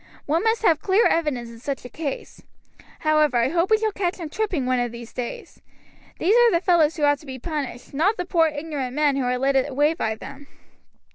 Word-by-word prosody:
One 325 +5 0
must 450 0 +1
have 320 -7 +3
clear 400 +4 +3
evidence 280 -8 0
in 230 0 -12
such 270 +1 -5
a - - -5
case. 290 +1 -6 0.6
However, 305 -4 +3
I 235 +2 +2
hope 340 +4 +1
we 435 - +5
shall 435 0 -1
catch 370 -3 -2
him 335 -4 -6
tripping 360 -7 -2
one 255 0 +1
of 245 -1 -1
these 235 0 -10
days. 245 -1 -7 0.6
These 390 +7 +2
are 480 -1 +6
the 340 - +3
fellows 335 -3 +2
who 300 - -2
ought 290 -1 +3
to 300 - -16
be 260 -1 -6
punished, 280 -3 -5
not 365 +10 +1
the 360 - -3
poor 335 -2 +3
ignorant 290 -4 -4
men 295 -2 +2
who 270 -2 -1
are 250 0 0
led 270 +2 +1
away 290 +3 +2
by 220 -9 -2
them." 280 +5 -11
300 Hz, 220 wpm, -23 LUFS, 260-345 Hz, 0.6 s, are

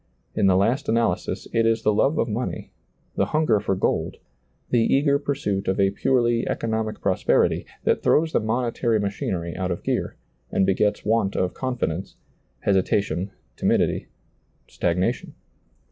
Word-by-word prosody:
In 100 - +2
the 95 - +4
last 120 +9 +1
analysis 115 -5 0
it 115 - +3
is 115 0 +1
the 105 - +3
love 135 +8 +2
of - - +1
money, 115 +3 -4 0.4
the - - +1
hunger 135 -10 +3
for 100 -1 -1
gold, - - -1 0.5
the 120 - +4
eager 140 +4 +3
pursuit 135 -9 -2
of 95 +2 0
a 95 0 +3
purely 120 +2 +1
economic 110 -1 -2
prosperity, 95 -2 +1 0.2
that - - +1
throws 160 +1 +3
the - - +3
monetary 115 0 0
machinery 95 -4 -3
out 95 0 -2
of 85 - -3
gear, - - -1 0.4
and 95 - +2
begets 105 +2 +1
want 105 -2 +1
of 90 -1 0
confidence, 120 -9 -3 0.5
hesitation, 95 -2 +1 0.3
timidity, - - +1 0.6
stagnation. 90 +1 -1
105 Hz, 145 wpm, -24 LUFS, 95-120 Hz, 0.6 s, the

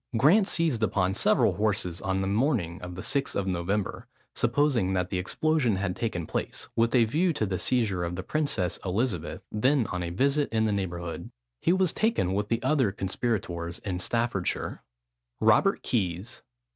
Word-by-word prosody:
Grant 180 - +5
seized 160 -9 +1
upon 95 -3 +1
several 90 - +3
horses 105 -4 0
on 95 -2 -1
the 95 - -1
morning 105 - 0
of 90 0 -7
the 90 - -6
6th 140 -1 0
of 100 - 0
November, 95 +2 -2 0.3
supposing 120 -6 +1
that 90 -1 -1
the 95 - 0
explosion 130 - +1
had 95 -1 -2
taken 90 -8 -2
place, - - -4
with 115 +2 +2
a 120 -2 +6
view 165 +10 +1
to 145 -7 -1
the 95 -3 -2
seizure 105 -8 +1
of 85 0 -3
the 95 - -5
Princess 125 - -1
Elizabeth, 95 -2 -2
then 125 +4 +2
on 90 -2 -2
a 85 - -3
visit 140 +10 +1
in 110 -1 +2
the 110 - +1
neighbourhood. 85 -4 -4 0.3
He - - +2
was 185 -2 +2
taken 220 - +1
with 100 +1 -1
the 115 - 0
other 135 -9 +2
conspirators 95 -4 -2
in 95 -4 -4
Staffordshire. 115 -1 -1 0.6
ROBERT - - +3
KEYS. 95 -1 -2
105 Hz, 170 wpm, -27 LUFS, 90-125 Hz, 0.6 s, a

